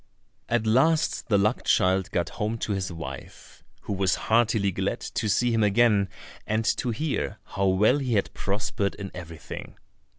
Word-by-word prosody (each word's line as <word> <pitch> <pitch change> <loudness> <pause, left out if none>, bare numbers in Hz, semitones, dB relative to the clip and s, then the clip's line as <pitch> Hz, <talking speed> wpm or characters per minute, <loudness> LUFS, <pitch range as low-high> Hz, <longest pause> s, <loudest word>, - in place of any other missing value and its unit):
At 120 -1 +1
last 150 +8 +2
the 105 - +4
luck 105 +5 +1
child 95 +1 +2
got 85 -4 -1
home 110 +2 0
to 110 - -3
his 95 -2 -2
wife, 70 -6 -9 0.2
who - - -4
was 95 -1 +1 0.2
heartily 110 -3 +3
glad - - -2
to 110 - -3
see 120 +4 +2
him 115 -1 +2
again, 105 -2 +3 0.4
and 110 +1 0
to 125 - -2
hear 145 +6 -2
how 100 +1 -1
well 105 +9 +4
he 130 -4 -1
had 100 - 0
prospered 100 0 -2
in 100 -2 -7
everything. 85 -3 -9
105 Hz, 165 wpm, -26 LUFS, 95-115 Hz, 0.4 s, the